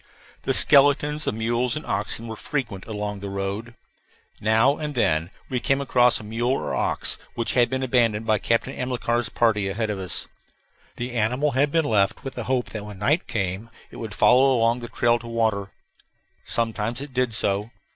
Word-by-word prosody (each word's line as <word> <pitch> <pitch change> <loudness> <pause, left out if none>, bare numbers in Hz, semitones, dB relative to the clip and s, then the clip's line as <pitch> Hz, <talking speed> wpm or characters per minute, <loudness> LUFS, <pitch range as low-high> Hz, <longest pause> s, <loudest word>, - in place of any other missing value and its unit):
The - - 0
skeletons 145 +1 +4
of - - 0
mules 120 +2 0
and 150 - -5
oxen 115 - -2
were 110 - -5
frequent 115 -6 -4
along 105 -2 -4
the 100 0 -6
road. 100 +4 -4 0.6
Now 110 +6 +3
and 150 -2 -4
then 80 -8 +1 0.2
we 125 - -1
came 135 +3 +1
across 125 -3 +3
a - - -10
mule 115 +4 -1
or - - -2
ox - - -1 0.2
which 115 -2 -1
had 120 -2 +3
been 130 +1 -2
abandoned 115 -4 +2
by 110 -2 +2
Captain 115 +5 0
Amilcar's 120 -2 -1
party, 105 -5 +1
ahead 110 +2 -2
of 100 - -4
us. 90 -4 -3 0.7
The 120 +1 -4
animal 125 +5 +1
had 140 +2 +2
been 165 -1 +2
left 105 -1 +1
with 135 - -5
the 120 - -5
hope 130 -1 0
that 105 -2 -5
when 105 -1 -9
night 145 - +1
came 105 -2 -2 0.2
it - - -11
would 110 -2 -6
follow 130 +1 +5
along 115 +1 +2
the 120 - -7
trail 120 0 +2
to 115 - -10
water. 110 -4 0 0.7
Sometimes 115 +1 -1
it 140 -1 -8
did 125 -3 0
so. 105 +1 0
115 Hz, 185 wpm, -24 LUFS, 105-130 Hz, 0.7 s, follow